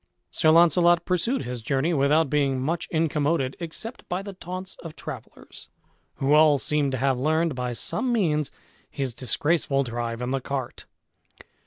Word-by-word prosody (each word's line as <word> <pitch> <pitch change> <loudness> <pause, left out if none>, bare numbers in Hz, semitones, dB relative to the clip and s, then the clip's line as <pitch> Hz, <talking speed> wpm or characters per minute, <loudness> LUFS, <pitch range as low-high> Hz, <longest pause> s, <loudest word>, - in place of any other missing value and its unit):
Sir 155 - +2
Launcelot 170 +1 +5
pursued 190 +9 0
his 125 -1 -5
journey, 135 +8 0
without 150 +2 +3
being 140 -2 +1
much 160 +6 -2
incommoded 150 -3 0
except 180 +8 -6
by 180 +1 -2
the 200 0 -7
taunts 185 +1 -7
of 165 -2 -10
travellers, 135 -7 -10 0.5
who 135 +2 +1
all 150 -1 +6
seemed 145 0 0
to - - 0
have 130 0 +1
learned, 160 +3 +1
by 125 -1 -3
some 170 - -2
means, 155 - +1 0.4
his 135 -4 -3
disgraceful 140 +2 +1
drive 120 -1 -4
in 125 - -2
the 135 0 -1
cart. 130 -2 -5
150 Hz, 155 wpm, -25 LUFS, 135-170 Hz, 0.5 s, all